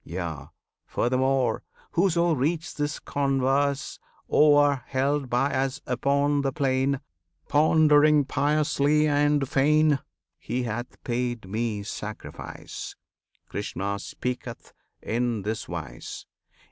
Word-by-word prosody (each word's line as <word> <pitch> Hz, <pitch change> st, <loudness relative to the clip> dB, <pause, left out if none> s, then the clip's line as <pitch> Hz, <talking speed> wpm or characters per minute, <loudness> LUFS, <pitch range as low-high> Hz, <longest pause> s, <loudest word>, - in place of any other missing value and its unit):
Yea, 85 Hz, -5 st, -5 dB, 0.4 s
furthermore, 130 Hz, -1 st, +1 dB, 0.3 s
Whoso 170 Hz, -1 st, +2 dB
reads 155 Hz, +4 st, -1 dB
this 145 Hz, +1 st, -2 dB
converse 140 Hz, 0 st, 0 dB, 0.3 s
o'er, 145 Hz, -2 st, +5 dB
Held 135 Hz, 0 st, 0 dB
by 125 Hz, +4 st, +1 dB
Us 135 Hz, +1 st, -1 dB
upon 140 Hz, +3 st, +1 dB
the 135 Hz, -1 st, 0 dB
plain, 135 Hz, -1 st, 0 dB, 0.5 s
Pondering 150 Hz, -1 st, +5 dB
piously 150 Hz, +1 st, +2 dB
and 145 Hz, -1 st, +2 dB
fain, 150 Hz, +2 st, +3 dB, 0.4 s
He 125 Hz, +2 st, -2 dB
hath 120 Hz, +1 st, -5 dB
paid 120 Hz, -3 st, -2 dB
Me 110 Hz, 0 st, -2 dB
sacrifice! 105 Hz, 0 st, -7 dB, 0.5 s
(Krishna 100 Hz, -1 st, -3 dB
speaketh 125 Hz, +2 st, -6 dB, 0.3 s
in 115 Hz, -2 st, -1 dB
this 110 Hz, +2 st, -3 dB
wise!) -, -, -7 dB
135 Hz, 95 wpm, -26 LUFS, 120-145 Hz, 0.5 s, o'er